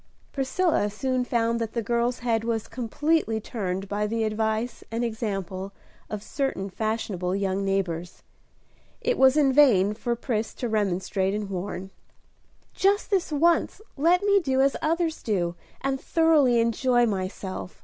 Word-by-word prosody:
Priscilla 275 - +1
soon 255 +4 -1
found 235 -1 0
that 225 -1 -3
the 235 - -1
girl's 235 +2 0
head 225 -2 +1
was 225 -2 -2
completely 255 0 0
turned 195 -3 -4
by 205 +1 -1
the 225 +1 -1
advice 220 +2 -1
and 230 +2 -1
example 195 -4 -4 0.4
of 210 -1 -5
certain 215 -8 -2
fashionable 200 -4 -2
young 195 0 -1
neighbors. 180 -3 -2 0.8
It - - +1
was 265 -2 +5
in 275 -3 +4
vain 215 -9 +5
for 235 +2 -2
Pris 230 -2 -3
to 245 - -3
remonstrate 195 -2 0
and 210 -2 -4
warn. 190 0 -5 0.8
"Just 405 +3 +1
this 375 -5 +1
once 335 +6 +2 0.2
let 345 +6 +3
me 400 -1 +4
do 265 -7 0
as 275 +1 +3
others 325 +1 0
do, 180 -6 0 0.3
and 270 -1 -1
thoroughly 305 -7 +4
enjoy 240 +2 +2
myself." 190 -2 -4
230 Hz, 145 wpm, -26 LUFS, 200-270 Hz, 0.8 s, was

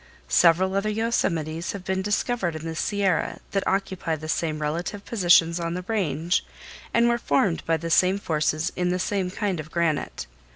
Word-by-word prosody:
Several 170 - +4
other 200 +2 0
yosemites 170 -7 -1
have 200 -2 -7
been 190 0 0
discovered 205 -3 -1
in 155 +1 -6
the 165 - -3
Sierra 195 +1 0
that 195 - 0
occupy 190 -4 -1
the 155 0 -8
same 155 -1 -1
relative 170 +7 -3
positions 175 -5 +4
on 170 0 -2
the 180 - -4
Range 180 -5 0 0.5
and 235 0 +4
were 235 0 +2
formed 165 -1 +1
by 165 0 +2
the 165 +1 -5
same 185 +3 +4
forces 155 -1 0
in 180 0 0
the 180 - +1
same 185 0 -1
kind 195 -2 -2
of 155 0 -7
granite. 165 -2 -1
180 Hz, 175 wpm, -25 LUFS, 165-195 Hz, 0.5 s, Several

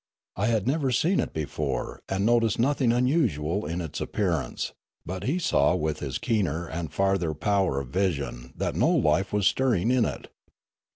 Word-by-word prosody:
I 100 +3 0
had 110 -4 +1
never 140 0 +1
seen 170 +10 +2
it - - -1
before, 75 -3 -3
and 95 +1 0
noticed 115 -2 +3
nothing 130 0 +2
unusual 115 - +1
in 85 +2 -3
its 80 -4 -5
appearance; 85 - -2 0.3
but 90 +1 -5
he 150 +7 +1
saw 180 - +2
with 75 0 -1
his 70 -3 -3
keener 85 - -1
and 80 -2 -5
farther 95 -4 +1
power 95 -2 +1
of 70 -2 -7
vision 70 -8 -2
that - - -1
no - - +2
life 85 +6 +2
was 105 -2 +1
stirring 120 -1 +2
in 125 -2 +3
it. - - -5
95 Hz, 170 wpm, -26 LUFS, 80-115 Hz, 0.3 s, noticed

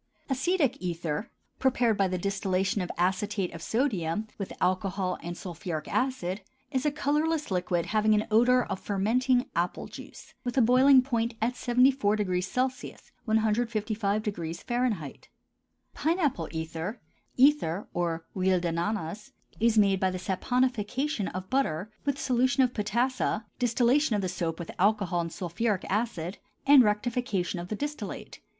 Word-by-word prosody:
ACETIC 280 -1 +1
ETHER, 170 +2 -3 0.3
prepared 245 -4 +2
by 195 -1 +2
the 185 0 -2
distillation 195 +1 0
of 180 - -3
acetate 190 +2 0
of 165 - -8
sodium 210 - 0
with 195 - -4
alcohol 185 0 0
and 175 +1 -6
sulphuric 170 -3 -5
acid, 250 -7 -1 0.3
is 265 +1 0
a - - +2
colorless 300 0 0
liquid 180 -2 0
having 215 0 +3
an 210 - +1
odor 245 +3 +5
of 190 - -4
fermenting 245 +6 +1
apple 175 +1 -1
juice, - - -11
with 245 +1 -3
a - - +6
boiling 255 +3 +6
point 235 -3 -1
at 230 +3 +1
74° 240 -3 +2
C. - - -9 0.3
(155° 215 - -1
F.). - - -23 0.6
PINE 330 +4 0
APPLE 260 - 0
ETHER 160 +6 -4 0.4
(ether 255 - +3
or 170 -1 -2
huile 185 -1 +2
d'ananas) 175 +3 -3 0.3
is 230 0 +3
made 200 -2 +4
by 190 - +2
the 185 - -3
saponification 245 +5 -1
of 185 +1 -6
butter 215 - 0
with 280 -1 0
solution 255 +1 +2
of 250 -1 +1
potassa, 225 +1 0
distillation 245 +2 +3
of 200 - -1
the - - 0
soap 170 -2 -2
with 170 - -6
alcohol 195 -3 +2
and 165 -1 -4
sulphuric 190 +5 -2
acid, 195 -4 -2 0.3
and 280 -1 +8
rectification 210 -4 0
of 175 - -6
the 215 - -3
distillate. 290 +6 -5
210 Hz, 140 wpm, -28 LUFS, 180-250 Hz, 0.6 s, and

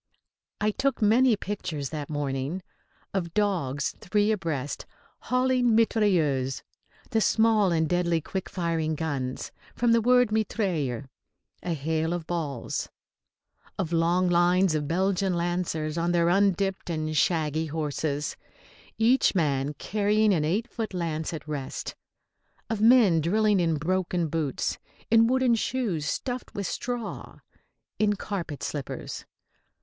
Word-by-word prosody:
I 215 0 +2
took 270 +4 0
many 230 +3 +4
pictures 165 -9 -4
that 150 -2 -5
morning 145 +4 -2 0.5
of 170 -4 -3
dogs, 155 -10 0
three 210 +3 +1
abreast, 160 -9 -3 0.4
hauling 250 -2 +3
mitrailleuse, 170 - +2 0.5
the 225 -3 +2
small 220 -3 +3
and 160 -1 +2
deadly 175 0 +1
quick 190 +4 -5
firing 165 -3 -1
guns, 140 -5 -3 0.2
from 240 -1 +2
the 230 0 +4
word 250 -1 +4
mitraille, 180 - -1 0.6
a 175 - -2
hail 160 +3 -1
of 175 -2 -4
balls; 155 -8 -3 0.9
of 175 -3 -2
long 170 +2 +2
lines 175 +1 +3
of 150 -2 -1
Belgian 190 +2 +1
lancers 170 -2 -1
on 170 +1 +1
their 170 -1 +3
undipped 195 0 +1
and 155 -1 -2
shaggy 160 +1 +1
horses, 150 -1 -2 0.6
each 235 0 +3
man 145 -4 0
carrying 210 +5 +2
an 160 -4 +1
eight 200 +10 0
foot 220 -5 -5
lance 160 -3 -2
at 155 -2 -7
rest; 145 -3 -4 0.8
of 215 -2 -1
men 220 -8 +6
drilling 210 +4 +2
in 165 -2 +2
broken 175 +1 -1
boots, 150 -4 -2 0.3
in 230 0 +6
wooden 255 -1 +3
shoes 220 - -1
stuffed 250 - -4
with 200 - -3
straw, 240 +3 -4 0.6
in 210 -1 +3
carpet 175 -8 -5
slippers. 145 -3 -5
175 Hz, 125 wpm, -27 LUFS, 155-210 Hz, 0.9 s, men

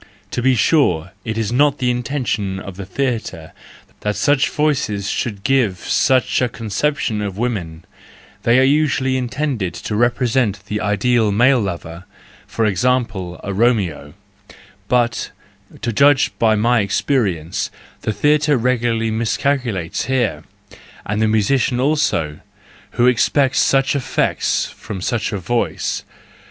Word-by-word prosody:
To 125 - -2
be 130 +1 +3
sure, 95 - +2
it 110 0 -4
is 115 -1 -1
not 145 +3 +3
the 125 -1 +1
inten¬ 125 +2 -3
tion 95 -4 -2
of 95 -1 -8
the 95 0 -8
theatre 115 -9 -3 0.5
that 105 0 -2
such 145 -1 +2
voices 125 -10 0
should 100 -4 -3
give 125 -8 +2
such 130 +6 +1
a 125 - +1
conception 115 +1 -2
of 100 -2 -4
women; 90 -9 -3 0.6
they 120 +1 +3
are 130 - +5
usually 135 -2 +2
intended 125 - -2
to 105 +5 -4
represent 120 -2 +1
the 105 0 -3
ideal 110 +1 +2
male 120 +5 +4
lover, 85 -3 -5 0.4
for 115 - -1
example, 105 -4 0
a 100 - -3
Romeo; 95 - 0 0.7
but, 120 -1 +1 0.5
to 120 - -1
judge 140 +3 +4
by 110 -1 +4
my 120 +3 +2
experience, 100 - -1 0.3
the - - -1
theatre 150 +4 +2
regularly 115 -2 0
miscalculates 115 - -1
here, 130 -4 0 0.6
and 105 +2 -2
the 110 - +3
musician 120 +4 +1
also, 130 - 0 0.5
who 120 - +2
expects 130 +2 +3
such 135 +1 +2
effects 130 -5 0
from 100 - -8
such 115 +4 -2
a 105 - -2
voice. 120 +6 -2
115 Hz, 135 wpm, -19 LUFS, 100-130 Hz, 0.7 s, are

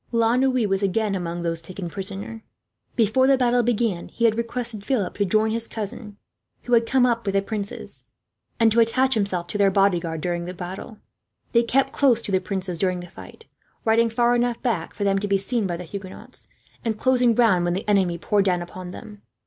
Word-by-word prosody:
La 230 0 +2
Noue 255 -3 +2
was 195 0 0
again 205 +1 0
among 175 -2 -3
those 165 -1 -1
taken 180 +2 -7
prisoner. 200 +4 -4 0.5
Before 235 +3 +3
the 270 -1 +5
battle 245 -1 +3
began, 230 -6 0
he 235 - -1
had 225 - +5
requested 235 -1 -2
Philip 210 -7 -1
to 205 - +3
join 215 +3 +2
his 230 +1 +4
cousin, 210 -1 -6 0.5
who 245 - -2
had 230 -1 +4
come 260 0 +3
up 235 -1 +1
with 195 -2 -2
the 195 - +3
princes; 205 -1 -5 0.6
and 225 -1 +5
to 230 - +3
attach 255 +4 +3
himself 200 -6 -1
to 205 +4 -5
their 200 -1 +5
bodyguard, 175 -4 +1
during 175 0 -2
the 180 +1 -6
battle. 185 +5 -7 0.5
They 235 - +4
kept 260 +3 +1
close 260 -5 +3
to - - -3
the 190 -1 +2
princes 185 -3 -3
during 185 -2 0
the - - -8
fight, 450 - -13 0.4
riding 230 +1 +3
far 240 +1 +2
enough 240 -1 0
back 215 -10 -2
for 205 - -3
them 195 -1 +2
to 205 - -3
be 200 0 +2
seen 210 +2 -1
by 175 -2 -3
the 180 - -7
Huguenots, 190 +2 -8 0.4
and 225 -2 -1
closing 250 -1 +3
round 205 -7 +3
when 175 - 0
the 195 - -5
enemy 190 -4 +2
poured 200 +3 +1
down 180 -2 +1
upon 180 +1 -9
them. 210 +2 -11
210 Hz, 210 wpm, -23 LUFS, 185-235 Hz, 0.6 s, the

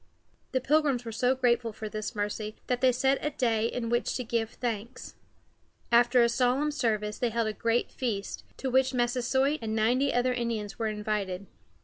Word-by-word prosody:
The 260 - +1
Pilgrims 280 -3 +2
were 225 - -4
so 250 +4 +2
grateful 240 -2 +1
for 215 0 -6
this 215 +2 -5
mercy 210 +1 -3
that 250 -1 -1
they 260 -1 +5
set 265 +2 +1
a 300 - +1
day 230 -6 +1
in 235 0 -3
which 240 +1 0
to 250 - -2
give 225 -1 -1
thanks. 235 +1 -5 0.8
After 240 +1 +5
a - - +5
solemn 250 +5 +1
service 215 -7 -1
they 245 - +1
held 230 0 0
a - - -3
great 230 +2 0
feast, 215 -6 -3
to 265 - -3
which 260 0 +3
Massasoit 255 +4 +1
and 220 -1 -2
ninety 245 +6 +2
other 250 +1 +2
Indians 230 -4 -3
were 225 - 0
invited. 210 -3 -2
240 Hz, 185 wpm, -28 LUFS, 220-255 Hz, 0.8 s, they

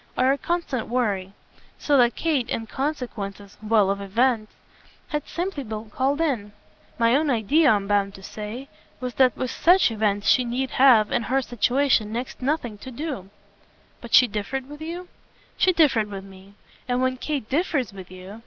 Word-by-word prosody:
are 260 +1 +4
a 275 - +1
constant 340 -9 -2
worry; 205 -6 -1 0.5
so 290 - +1
that 240 -3 +4
Kate, 295 -7 0
in 225 - -2
consequence 220 -7 -5
well, 215 -2 +3
of 200 0 -3
events! 220 +2 +1 0.6
has 300 - -1
simply 345 -4 -3
been 215 -2 -7
called 275 +5 0
in. 240 -11 -1 0.4
My 230 +1 +3
own 300 +1 +2
idea, 275 +7 +3
I'm 205 -2 +2
bound 200 -1 +1
to 195 - -13
say, 215 +7 -7 0.3
was 250 -1 -4
that 260 -2 +4
with 255 -1 -2
SUCH 355 -6 +4
events 205 -2 0
she 255 - +5
need 255 +2 -2
have, 245 -6 +5
in - - +1
her 265 +4 0
situation, 245 -1 +1
next 240 +3 -5
to 255 - -6
nothing 250 -8 -1
to 260 - -9
do." 260 - -5 0.7
"But 235 - +1
she 250 - +8
differed 235 +5 -4
with 295 +1 -11
you?" 345 +3 -6 0.5
"She 370 - +3
differed 270 - +3
with 195 -1 -7
me. 195 +1 -15 0.3
And 245 0 0
when 255 0 0
Kate 280 -4 -3
differs 280 - -1
with 190 -2 -10
you 185 +4 -10
245 Hz, 180 wpm, -24 LUFS, 210-275 Hz, 0.7 s, she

